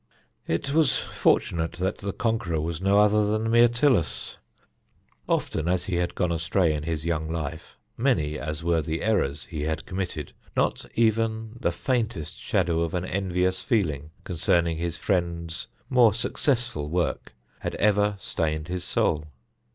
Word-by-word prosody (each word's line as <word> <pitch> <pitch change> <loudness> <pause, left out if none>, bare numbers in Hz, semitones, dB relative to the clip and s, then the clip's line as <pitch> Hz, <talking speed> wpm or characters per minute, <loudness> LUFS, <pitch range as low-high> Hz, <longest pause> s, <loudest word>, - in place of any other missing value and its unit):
It 85 +13 -1
was 155 -4 +4
fortunate 80 -1 +1
that 95 +2 -2
the 100 0 -3
conqueror 110 -8 -1
was 80 +2 -3
no 100 +1 +3
other 105 0 +5
than 110 +2 0
Myrtilus. 120 - +3 0.9
Often 80 - 0
as 90 0 +1
he 90 -3 -1
had 85 0 -1
gone 90 - +1
astray 85 +1 +2
in 75 - -2
his 80 0 -3
young 80 -2 -1
life, 80 -1 -5 0.2
many 80 - +1
as 75 +1 -4
were 85 -1 +2
the 80 +1 -3
errors 75 -10 +1
he 80 -4 -5
had 80 +1 -2
committed, 90 -6 -4 0.2
not - - +1
even 110 -1 +1
the - - +1
faintest 110 - -2
shadow 85 -3 +1
of 85 +1 -1
an 90 0 -1
envious 95 -1 0
feeling 80 - 0
concerning 85 -1 +1
his 85 -1 -2
friend's 85 -3 -1 0.2
more 120 -5 +5
successful 120 - 0
work 85 +1 -1 0.2
had - - -3
ever 105 0 +3
stained 80 -4 -2
his 90 0 -3
soul. 75 -2 +1
90 Hz, 150 wpm, -26 LUFS, 80-105 Hz, 0.9 s, other